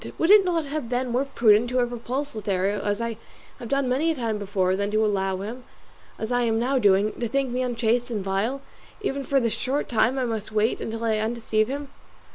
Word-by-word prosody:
would 330 +4 +3
it 420 -1 +8
not 340 -4 0
have 285 -4 -4
been 250 0 -1
more 255 +3 +1
prudent 230 -3 +3
to 250 - -1
have 245 -1 +1
repulsed 255 +5 -4
Lothario, 200 -1 -1
as 205 +1 -1
I 230 -1 -3 0.4
have 240 - -7
done 275 -1 +1
many 270 +6 +1
a 325 - +1
time 225 -5 -2
before, 190 -2 0
than 200 +1 -1
to 215 +1 +2
allow 195 -2 0
him, 235 +5 -6 0.5
as 220 +2 -4
I 245 0 +2
am 225 -2 +1
now 260 +3 +1
doing, 205 -1 +3
to 240 - -1
think 270 +2 -1
me 250 +1 -1
unchaste 245 0 0
and 215 -5 -3
vile, 210 +8 -1 0.4
even 280 -9 -2
for 275 +1 +2
the 230 -3 0
short 270 +6 -1
time 235 +3 +2
I 260 - 0
must 220 -2 -4
wait 215 +2 +1
until 225 +1 -4
I 220 -1 +1
undeceive 220 -1 0
him? 280 +2 -5
235 Hz, 225 wpm, -25 LUFS, 215-260 Hz, 0.5 s, it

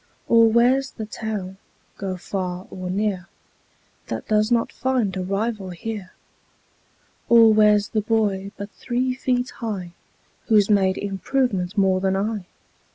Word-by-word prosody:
Or 230 -1 +5
where's 250 +4 +3
the 220 - -6
town, 210 -3 -5 0.4
go 190 -2 -4
far 180 0 -4
or 185 -1 -6
near, 190 -2 -1 0.8
That - - -5
does 215 +1 +2
not 235 -1 +2
find 250 -7 -1
a 190 - -2
rival 200 +1 -2
here? 195 +1 -6 1.2
Or 230 -2 +7
where's 210 -1 +4
the 215 - 0
boy 205 -3 0
but 200 +1 -7
three 255 +1 -2
feet 250 0 -1
high 200 -7 -5 0.6
Who's 215 -2 +4
made 190 -2 +3
improvement 200 -1 -1
more 190 -1 +3
than 190 0 +1
I? 205 -1 -2
210 Hz, 135 wpm, -23 LUFS, 190-230 Hz, 1.2 s, Or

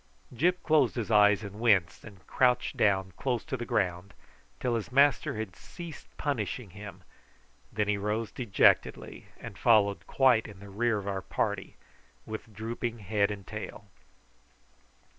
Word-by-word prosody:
Gyp 175 +8 +1
closed 155 -1 +3
his 115 -2 -3
eyes 105 -1 +5
and 100 +1 -8
winced 100 -6 +2
and 100 -4 -14
crouched 125 -2 +1
down 95 -2 +2
close 125 -3 -2
to 155 - -3
the 120 -2 -5
ground 90 +1 -1 0.4
till 125 -2 -1
his 115 +1 -3
master 140 -4 +3
had 110 -5 -5
ceased 170 -4 -10
punishing 120 -6 -3
him, 100 -1 -10 0.7
and - - -22
then 105 -1 +1
he 105 -1 +1
rose 105 +2 -2
dejectedly, 120 -7 +1
and - - -9
followed 100 -5 +3
quite 130 -4 +3
in 105 -3 -12
the 100 0 -11
rear 115 +3 0
of 100 -1 -6
our 95 -1 -2
party - - -3 0.5
with 110 +1 -7
drooping 115 +3 -4
head 100 -1 0
and 100 -2 -6
tail. 105 -1 -8
105 Hz, 155 wpm, -29 LUFS, 100-120 Hz, 0.7 s, eyes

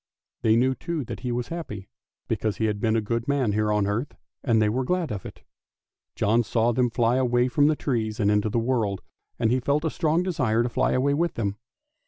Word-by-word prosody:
They 110 0 +4
knew, 130 +3 +3
too, 165 +2 -4
that - - -7
he 125 0 -3
was 120 0 -3
happy, 105 - -6 0.4
because 110 -2 -1
he 110 - 0
had 105 -1 -1
been 110 +1 +1
a 115 - +2
good 115 +3 -2
man 140 -6 +1
here 105 +1 +1
on 105 -1 +2
earth, 110 +8 -3 0.3
and 115 -4 +3
they 110 - +3
were 125 +5 0
glad 175 0 -1
of 100 -3 -5
it. - - -13 0.7
John 110 +3 +2
saw 115 +1 +1
them 125 +1 +1
fly 120 +1 +1
away 125 -1 +2
from 145 +4 +3
the 155 - +3
trees 115 -6 -2
out 105 -2 +2
into 105 +1 +2
the 110 - -1
world, 115 -5 0 0.3
and 115 - +1
he 130 - +2
felt 145 +5 0
a 160 - 0
strong 165 +1 +1
desire 130 -11 +1
to 120 - -1
fly - - +1
away 140 +2 +2
with 170 +3 0
them. 100 -3 -2
120 Hz, 230 wpm, -25 LUFS, 110-130 Hz, 0.7 s, They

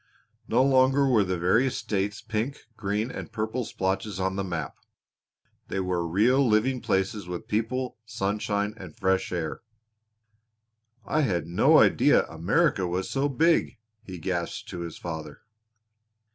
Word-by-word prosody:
No 120 +3 +3
longer 135 +1 +4
were 115 -6 +4
the 90 -1 -2
various 110 +10 +2
states 100 0 -2
pink, 115 +6 -3
green, 105 +3 -2
or - - -5
purple 110 +2 -3
splotches 95 +1 -2
on 95 0 -1
the 100 - -1
map; 80 -6 -4 0.9
they 95 - -3
were 90 -2 -1
real 115 +11 +3
living 120 +2 +2
places 95 +1 -1
with 90 -1 -6
people, 120 +3 -2
sunshine, 105 -1 -2
and 90 -5 -11
fresh 95 -1 +1
air. 85 -4 -3 1.4
"I 155 - +1
had 95 - 0
no 85 +1 +4
idea - - +5
America 95 - +1
was 90 +2 -2
so 140 +1 +1
big!" 155 -2 +2 0.2
he 95 -5 -9
gasped 85 0 -3
to - - -6
his 85 -2 -6
father. 80 -3 -7
100 Hz, 140 wpm, -27 LUFS, 90-120 Hz, 1.4 s, idea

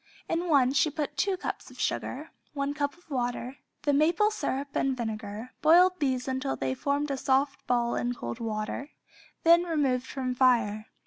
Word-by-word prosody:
In 340 +1 -1
one 270 -4 +4
she 285 +2 +3
put 295 0 -4
two 375 +7 +1
cups - - -5
of - - -15
sugar, - - -2 0.2
one 280 0 -1
cup 285 +1 -2
of 350 - -25
water, 245 +1 -2 0.3
the 290 -1 +2
maple 335 +9 +3
syrup 280 -8 -2
and 265 -1 0
vinegar, 220 0 -5
boiled 360 +4 +6
these 260 -3 0
until 265 +1 -1
they 130 -1 -2
formed 285 - -1
a 275 - -1
soft 270 +2 0
ball 240 -1 +1
in 245 0 -1
cold 120 - -6
water, 220 +5 -3 0.5
then 335 +1 +7
removed 280 -7 0
from 255 -2 -3
fire. 230 -5 +2
270 Hz, 175 wpm, -28 LUFS, 245-295 Hz, 0.5 s, then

